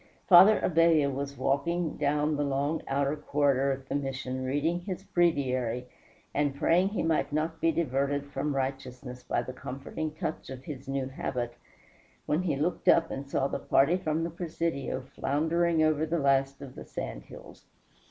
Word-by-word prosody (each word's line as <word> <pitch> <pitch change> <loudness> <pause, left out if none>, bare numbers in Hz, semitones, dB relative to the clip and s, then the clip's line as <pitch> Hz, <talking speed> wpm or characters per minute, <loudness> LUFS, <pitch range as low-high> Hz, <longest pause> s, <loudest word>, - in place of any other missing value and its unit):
Father 190 +4 +8
Abella 165 -4 +4
was 140 +1 -4
walking 150 +6 0
down 150 +1 +1
the 145 - 0
long 140 +3 -1
outer 140 +1 0
corridor 140 -2 +1
of 135 0 -5
the - - -4
Mission 135 -2 -3
reading 145 +6 0
his 185 +1 -6
breviary, 130 - 0 0.5
and 145 -1 0
praying 175 +6 +3
he 210 - -2
might 165 -2 +1
not 155 +2 -2
be 165 - +3
diverted 140 -2 0
from 145 0 -3
righteousness 130 -1 -4
by 120 - -1
the 130 - -7
comforting 140 +5 -5
touch 160 -2 -4
of 130 -1 -8
his 135 -2 -8
new 135 -1 -1
habit, 125 -3 -3 0.7
when 150 +4 +1
he 170 -6 0
looked 155 +6 -2
up 165 -1 +4
and 140 +1 -5
saw 135 0 +1
the - - -3
party 140 +6 +3
from 160 -3 -1
the 170 - -3
presidio 165 -5 -3
floundering 160 +5 0
over 155 -1 +2
the 170 +2 0
last 140 -1 +1
of 130 -2 -9
the - - -9
sand - - -5
hills. - - -13
145 Hz, 170 wpm, -29 LUFS, 135-165 Hz, 0.7 s, Father